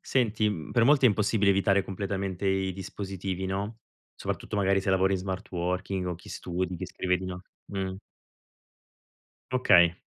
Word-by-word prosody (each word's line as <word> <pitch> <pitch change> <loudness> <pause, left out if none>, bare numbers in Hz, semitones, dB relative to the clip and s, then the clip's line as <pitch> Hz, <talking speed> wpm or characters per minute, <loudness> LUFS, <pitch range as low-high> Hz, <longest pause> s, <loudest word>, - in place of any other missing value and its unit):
Senti, 110 -4 +1
mhmm, 80 -8 -4
per 115 - +4
molti 140 +1 +5
è - - +9
impossibile 105 -1 +2
evitare 100 0 +3
completamente 95 0 -3
i 95 0 +1
dispositivi, 95 0 -4
no, 100 +4 -3 0.4
soprattutto 105 - -4
magari 95 -1 +3
se 95 - -1
lavori 95 0 +3
in 95 - +1
smart 95 +1 -5
working 90 +1 -2
o 90 - -2
chi 85 - -14
studi, 90 +1 -3
chi - - -5
scrive 90 -1 0
di 95 - -7
no 90 0 -6 0.2
mh. 95 -2 -3 1.6
Okay. 85 -9 +5
95 Hz, 160 wpm, -28 LUFS, 95-100 Hz, 1.6 s, è